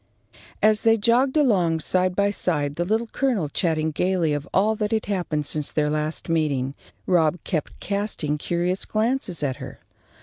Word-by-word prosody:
As 215 0 +4
they 225 0 +4
jogged 245 +6 +2
along, 185 - +3
side 185 +3 +1
by 200 +1 +2
side, 150 -8 0
the 175 +3 -2
Little 220 +5 0
Colonel 225 - -1
chatting 160 -1 0
gaily 175 -1 +1
of 145 0 -3
all 210 +3 +3
that 210 -1 -1
had 220 -1 0
happened 175 -7 -2
since 150 +1 -2
their 150 -1 0
last 155 +1 -2
meeting, 145 -5 0 0.3
Rob 170 -2 +3
kept 155 -6 -3
casting 200 -7 -2
curious 175 +4 -1
glances 215 - 0
at 135 -3 -1
her. - - -9
180 Hz, 165 wpm, -24 LUFS, 155-210 Hz, 0.3 s, As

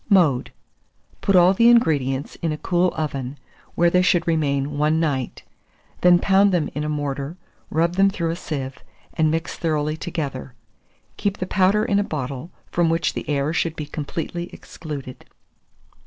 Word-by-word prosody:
Mode. 165 - +3 0.7
Put 195 - +2
all 180 +1 +6
the 230 +4 +5
ingredients 145 - +2
in 165 - 0
a 150 - -3
cool 175 +2 +1
oven, 140 -3 -3 0.4
where 170 0 +3
they 180 - +4
should 180 -1 +2
remain 145 -3 0
one 155 +2 +2
night; 140 -6 -2 0.6
then 180 0 +7
pound 195 +2 +4
them 170 -5 0
in 150 - -3
a 150 - -2
mortar, 145 +1 -3 0.3
rub 170 +3 0
them 195 0 +5
through 170 -4 -2
a - - -2
sieve, 140 -6 -5 0.3
and 155 -1 +2
mix 165 +2 -2
thoroughly 155 -2 0
together; 150 -7 -5 0.6
keep 200 -1 -1
the 185 - -3
powder 200 +3 +2
in 200 - +2
a - - +2
bottle, 140 -3 -5 0.2
from 170 -1 +2
which 165 +1 +1
the - - -6
air 145 +1 0
should 165 -1 0
be 150 - -5
completely 165 +4 -5
excluded. 140 -5 -8
160 Hz, 165 wpm, -22 LUFS, 145-180 Hz, 0.7 s, then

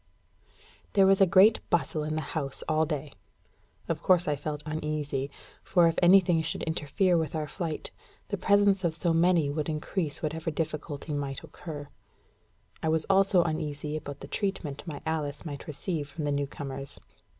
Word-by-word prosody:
There 195 -1 +6
was 195 0 +5
a 195 - +7
great 200 +5 +6
bustle 160 -2 +1
in 155 +1 -2
the 155 - -1
house 140 -4 -3
all 155 0 +2
day. 150 -2 -3 0.8
Of - - -2
course 180 -2 +4
I 150 - +2
felt 150 +1 -4
uneasy, 150 -3 -2 0.3
for 175 -2 +4
if 165 - +2
anything 175 -2 +6
should 160 +1 -3
interfere 165 +3 +1
with 160 -1 -2
our 155 -1 -2
flight, 160 0 -4 0.4
the 205 - 0
presence 200 0 +3
of 165 -2 +1
so 170 0 +1
many 165 -3 +3
would 150 +1 -2
increase 155 +1 -2
whatever 160 +1 -2
difficulty 150 -1 -4
might 140 -2 -3
occur. 145 -4 -8 0.9
I 160 - 0
was 160 0 +2
also 195 -2 +5
uneasy 150 -2 -3
about 145 -2 -6
the - - -7
treatment 180 -7 -3
my 145 -3 -6
Alice 155 -1 -2
might 145 -3 -6
receive 150 0 -3
from 150 +2 -6
the 145 - 0
new 140 0 0
comers. 135 -1 -6
155 Hz, 170 wpm, -28 LUFS, 145-175 Hz, 0.9 s, a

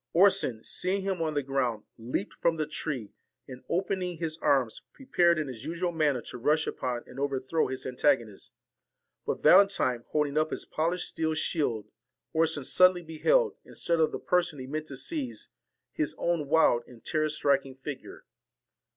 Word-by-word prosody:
Orson 185 - +3
seeing 190 +2 0
him 190 -3 -2
on 155 -2 -1
the 145 - 0
ground 130 -5 -1
leaped 125 - -4
from 165 -1 0
the 155 - 0
tree, 150 -7 -5 0.3
and, 130 -1 -10
open 190 +2 0
ing 180 -2 -3
his 160 -1 -2
arms, 135 -6 +1
prepared 175 - +2
in 155 -2 -1
his 125 -3 -8
usual 170 +3 -2
manner 150 -7 +1
to 125 - -8
rush 155 +6 +2
upon 120 -2 -3
and - - -11
overthrow 140 +2 0
his 130 0 -4
antagonist; 125 -5 0 0.8
but - - -2
Valentine 155 -9 +5
holding 150 0 +1
up 155 0 +1
his - - -4
polished 170 +3 -1
steel 160 -1 -1
shield 145 - -1 0.5
Orson 160 -3 +1
sudden 185 +7 +5
ly 175 - -8
beheld, 435 - +2
instead 170 -1 -2
of 160 - +3
the - - -3
person 180 -4 0
he 130 - -6
meant 155 +3 -4
to 135 - -6
seize, 280 - -3 0.4
his 310 - -1
own 170 -4 0
wild 145 -6 +4
and 120 -2 -16
terror 155 -1 0
striking 140 -3 +1
figure. 135 0 -8
155 Hz, 170 wpm, -28 LUFS, 130-170 Hz, 0.8 s, Valentine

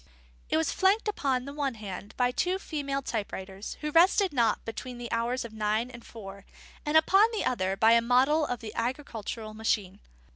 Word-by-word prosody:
_ - - -27 0.5
It - - +2
was 160 - +1
flanked 395 +4 +2
upon 270 -11 0
the 280 - -7
one 280 -4 -2
hand 205 -1 -8
by 250 -1 +2
two 360 +8 0
female 280 -6 -3
type 220 -5 -3
writers, 190 +2 -7
who 300 0 -2
rested 365 +3 +4
not 235 -5 +1
between 240 +2 -6
the 240 -1 -7
hours 235 +2 -1
of 225 - -9
nine 215 +3 0
and 235 -1 -11
four, 200 -3 -10 0.4
and 300 +1 +3
upon 390 +7 +6
the 440 - -2
other 195 -5 0
by 225 +2 +5
a 230 0 +6
model 260 +6 +3
of 245 -5 -3
the 215 -2 -7
agricultural 230 -3 -4
machine. 210 -3 -1
240 Hz, 195 wpm, -28 LUFS, 215-290 Hz, 0.5 s, upon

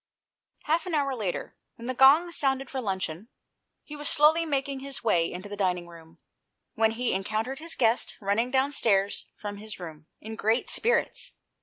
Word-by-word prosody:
Half 325 +4 0
an 345 - -1
hour 280 -2 +1
later, 200 -7 -4 0.2
when 230 - -10
the 255 - -2
gong 285 +7 +6
sounded 270 -4 0
for 265 - -3
luncheon, 190 -2 -3 0.6
he 300 - -9
was 295 0 +1
slowly 320 +2 +4
making 275 -2 -1
his 275 -1 -5
way 170 -7 +2
into 185 +3 -7
the 205 - -6
dining 180 -3 -1
room, 165 -1 -15 0.6
when 220 0 +2
he 245 +1 -1
encountered 215 +7 -2
his 330 +1 -3
guest 230 -1 +1
running 210 +4 0
downstairs 240 -7 +1
from 205 -1 -5
his 215 0 -7
room, 155 -3 -9
in 220 +1 -8
great 220 +2 +1
spirits. 475 - +1
230 Hz, 170 wpm, -27 LUFS, 200-275 Hz, 0.6 s, gong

